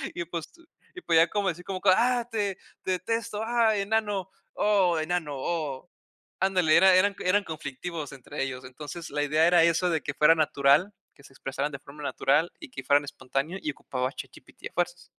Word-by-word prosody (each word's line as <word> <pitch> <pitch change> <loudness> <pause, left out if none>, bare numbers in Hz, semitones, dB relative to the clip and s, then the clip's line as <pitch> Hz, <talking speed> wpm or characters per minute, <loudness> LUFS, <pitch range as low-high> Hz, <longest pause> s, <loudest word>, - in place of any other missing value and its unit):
Y, 170 - -3
pues, 170 -1 -5 0.5
y 360 - -8
podía 165 - +4
como 200 -2 0
decir 180 +1 -6
como 185 -1 -4
que: 195 - +4
"Ah, 245 +1 +1
te 200 -4 -1 0.3
detesto. 215 +4 -2
Ah, 230 -2 +3
enano. 205 -2 -1 0.2
Oh, 195 -5 +2
enano, 160 -2 -2
oh". 150 0 -3 0.5
Ándale, 180 -5 +3
era 190 +1 +6
eran 200 +2 +3
eran 200 +3 +2
conflictivos 155 -1 -6
entre 135 0 -7
ellos. 130 -1 -5
Entonces, 150 +6 -8
la 145 - -2
idea 155 +2 +3
era 175 -1 +5
eso, 170 +2 +2
de 160 -3 0
que - - -4
fuera 160 +2 +5
natural, 150 +4 +3 0.2
que 140 - -20
se 135 - -17
expresaran 135 +2 -3
de 140 - -7
forma 145 +1 -12
natural, 150 +4 +1
y 315 - -10
que - - -8
fueran 145 0 +3
espontáneo, 145 +5 -4
y 150 - -2
ocupaba 130 -2 -4
ChatGPT - - -10
a - - -35
fuerzas. 175 0 -2
170 Hz, 185 wpm, -27 LUFS, 145-195 Hz, 0.5 s, era